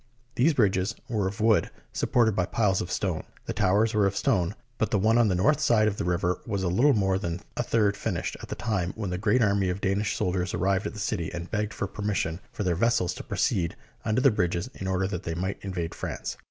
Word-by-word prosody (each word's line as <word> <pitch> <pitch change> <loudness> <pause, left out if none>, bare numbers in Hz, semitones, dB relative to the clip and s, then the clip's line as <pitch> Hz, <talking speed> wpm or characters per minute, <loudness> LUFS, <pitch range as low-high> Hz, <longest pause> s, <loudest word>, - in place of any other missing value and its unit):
These 145 +6 +3
bridges 100 -2 +2
were 105 -5 0
of 100 +4 -5
wood 110 0 +3 0.2
supported 110 -4 +2
by 90 -1 +1
piles 100 -4 +1
of 90 - -4
stone. 90 -6 -1 0.2
The - - -3
towers 105 +5 +2
were 105 -2 +3
of 100 0 -2
stone, 90 +2 +1 0.2
but 110 - +1
the - - +2
one 110 +4 +3
on 120 - +5
the 95 - +1
north 140 +12 +3
side 110 -7 +4
of 105 -1 -1
the - - -2
river 90 +1 0
was 100 -4 -1
little 115 +11 +4
more 95 -2 +2
than 85 -2 -3
a - - 0
third 110 -4 +2
finished - - -3
at - - -9
the - - -3
time 95 -7 -1
when 105 -4 -3
the 90 - -2
great 115 +4 +3
army 100 -2 +2
of 90 +2 -2
Danish 100 +2 0
soldiers 90 0 -1
arrived 95 +2 +1
at - - -6
the 105 - -8
city 95 -5 -2
and 85 0 -6
begged 105 0 -1
for - - -2
permission 100 -5 -2
for 105 - -4
their 90 -2 +1
vessels 95 -1 +2
to - - -8
proceed 85 -3 0 0.3
under 110 +3 +1
the 135 -1 +6
bridges 90 +2 -1
in 95 - -6
order 95 0 +1
that 90 -2 -3
they 85 -2 -4
might 95 +3 -3
invade 90 -4 -4
France. - - -4
100 Hz, 235 wpm, -27 LUFS, 90-110 Hz, 0.3 s, the